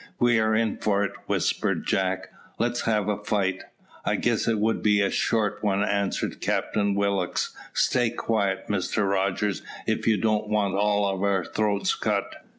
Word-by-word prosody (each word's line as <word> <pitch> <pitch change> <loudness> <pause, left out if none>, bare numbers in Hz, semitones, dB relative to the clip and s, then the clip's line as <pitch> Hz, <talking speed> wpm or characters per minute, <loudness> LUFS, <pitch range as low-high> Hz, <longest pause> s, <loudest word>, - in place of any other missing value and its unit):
"We 120 -1 +3
are 110 0 +2
in 110 -1 +1
for 100 -1 +1
it," 100 - -1 0.2
whispered - - 0
Jack. 95 -1 0 0.3
"Let's 120 +1 0
have 105 -3 +1
a 105 0 -2
fight." 95 -3 0 0.4
"I - - +1
guess - - 0
it 115 -1 +2
would 110 +2 +1
be 105 -1 +3
a 100 -1 +2
short 110 -3 0
one," 100 -1 +2
answered 100 -1 -1
Captain 100 -1 0
Willock; 100 -3 0 0.3
"stay 120 -2 +2
quiet, 100 -5 -1
Mr 100 +1 0
Rogers, 100 +1 0 0.2
if - - -1
you 110 -2 +4
don't 110 +1 +1
want 105 -3 +1
all 105 +1 +2
our 95 -2 0
throats 105 -2 0
cut." - - -1
105 Hz, 160 wpm, -26 LUFS, 100-110 Hz, 0.4 s, you